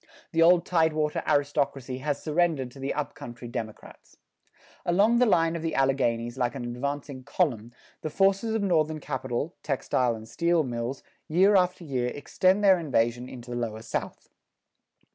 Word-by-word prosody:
The 165 -2 +1
old 170 +1 +6
tidewater 155 -3 +1
aristocracy 140 -3 0
has 145 +1 -3
surrendered 155 -5 0
to 135 - -14
the 135 +1 -2
up 150 -1 -3
country 120 -4 -9
democrats. 115 -3 -8 0.7
Along 205 +7 +3
the 250 - +4
line 165 -4 +3
of 165 - -4
the 165 0 -2
Alleghanies 130 -3 0
like 125 +1 0
an 130 - -5
advancing 135 +2 -4
column, 120 - -1 0.3
the 155 - -3
forces 195 +6 +2
of 220 - 0
Northern 155 -4 +1
capital, 130 +2 -3
textile 130 -3 0
and 110 0 -10
steel 170 +5 +1
mills, 120 0 -4 0.2
year 190 +6 +4
after 180 -1 +2
year 130 -5 -1
extend 185 +7 +1
their 190 -3 +6
invasion 125 -5 0
into 125 -1 -10
the 120 - -3
lower 110 -2 -4
South. - - -5
145 Hz, 160 wpm, -27 LUFS, 125-170 Hz, 0.7 s, old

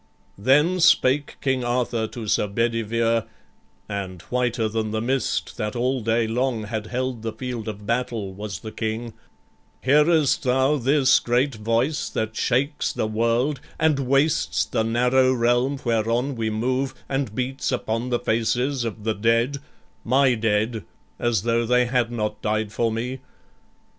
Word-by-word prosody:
Then 150 - +3
spake 145 -4 +3
King 130 -2 0
Arthur 120 -2 0
to 115 0 -7
Sir 105 - +2
Bedivere, 115 +1 0 0.6
And 95 -3 -5
whiter 120 -2 +1
than 110 0 -2
the 110 +1 -2
mist 130 +4 -1
that 105 +1 -3
all 125 +2 0
day 115 +1 +1
long 120 0 -1
Had 110 0 -4
held 125 0 -3
the 115 0 -3
field 120 -2 -5
of 105 -1 -6
battle 115 -4 -2
was 100 0 -6
the 110 - -7
King: 110 +1 -4 0.7
"Hearest 150 +2 +4
thou 130 +2 +2
this 135 +1 +4
great 125 +3 +1
voice 115 +7 0
that 110 0 -3
shakes 135 +6 0
the - - -2
world 115 +5 0 0.2
And 160 -3 +3
wastes 140 +3 +1
the - - -1
narrow 125 +3 +3
realm 120 +3 +1
whereon 120 +4 0
we 110 -1 -1
move, 130 +5 -1
And 135 -6 -2
beats 130 +2 -2
upon 120 -1 -2
the 120 - +1
faces 120 +4 0
of 110 -2 -5
the 110 0 0
dead, 115 +6 +1 0.5
My 130 +2 +3
dead, 110 -1 0 0.4
as 115 -4 +1
tho' 115 0 +1
they 125 +1 +3
had 120 -1 0
not 105 -2 -3
died 110 0 -1
for 115 0 +1
me? 125 +4 -3
120 Hz, 150 wpm, -23 LUFS, 110-130 Hz, 0.7 s, Hearest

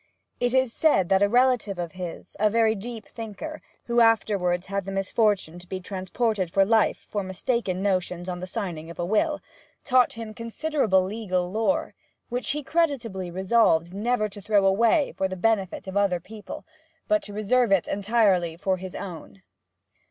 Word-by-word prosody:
It 245 0 +1
is 260 -3 +2
said 195 - +3
that 190 0 +4
a 200 - +4
relative 245 -4 +2
of 170 -2 -4
his, 180 -2 -8
a 215 +1 +4
very 220 0 +3
deep 225 +1 -7
thinker, 230 +8 -7 0.2
who 235 0 +2
afterwards 200 -6 +2
had 200 0 -3
the 195 - -5
misfortune 195 -3 0
to 175 - -14
be 190 - -4
transported 190 +1 -2
for 195 +3 +3
life 220 +1 +3
for 205 - -4
mistaken 190 0 -2
notions 180 -2 -1
on 180 -1 -4
the 185 - -6
signing 180 -6 -5
of 170 - -9
a 175 - -2
will, 295 - +1 0.4
taught 255 -2 +3
him 225 -1 -7
considerable 230 -3 0
legal 185 -3 -2
lore, 225 +7 0 0.4
which 245 +1 -2
he 295 +1 -1
creditably 260 - -1
resolved 185 -2 +2
never 215 +2 0
to 205 0 -11
throw 205 0 +2
away 230 +9 +3
for 190 - 0
the 185 0 -6
benefit 200 -2 0
of 190 0 -7
other 200 -3 +2
people, 210 +4 -10 0.4
but 315 0 +3
to 210 - -6
reserve 215 +3 +1
it 195 -3 +3
entirely 195 -5 +2
for 190 +1 0
his 185 0 -8
own. 160 - -8
200 Hz, 175 wpm, -25 LUFS, 185-230 Hz, 0.4 s, that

